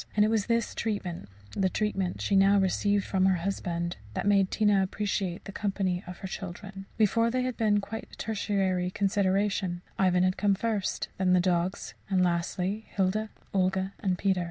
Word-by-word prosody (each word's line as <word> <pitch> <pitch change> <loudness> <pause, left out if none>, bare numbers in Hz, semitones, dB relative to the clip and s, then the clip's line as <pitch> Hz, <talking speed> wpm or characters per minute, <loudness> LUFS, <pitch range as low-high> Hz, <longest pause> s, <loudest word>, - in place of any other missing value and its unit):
And 210 0 +5
it - - +2
was 220 -3 +1
this 230 -1 +1
treatment 185 - -3 0.2
the 190 -2 +1
treatment 195 -3 -1
she 200 - +1
now 195 +1 +6
received 200 +1 +2
from 190 -1 +2
her 190 - +4
husband 175 -3 -2 0.2
that - - -2
made 200 -2 +4
Tina 210 -2 +3
appreciate 190 -2 -2
the - - -6
company 195 -3 -1
of 180 -1 -7
her 190 - -4
children. 195 +1 -7
Before, 230 +2 +3
they 255 +1 0
had 255 -1 -2
been 210 -3 +2
quite 220 +3 -6
a - - -12
tertiary 195 -4 0
consideration 195 -2 0 0.2
Ivan 180 -1 +3
had 185 0 +1
come 200 -1 +3
first; 210 -2 -2
then 185 -1 +3
the 180 - +5
dogs; 180 +1 0 0.2
and 185 -2 +3
lastly, 180 +4 -1
Hilda, 205 +3 0 0.2
Olga, 190 0 +1
and 185 -3 0
Peter. 190 -1 +1
195 Hz, 180 wpm, -28 LUFS, 185-205 Hz, 0.2 s, now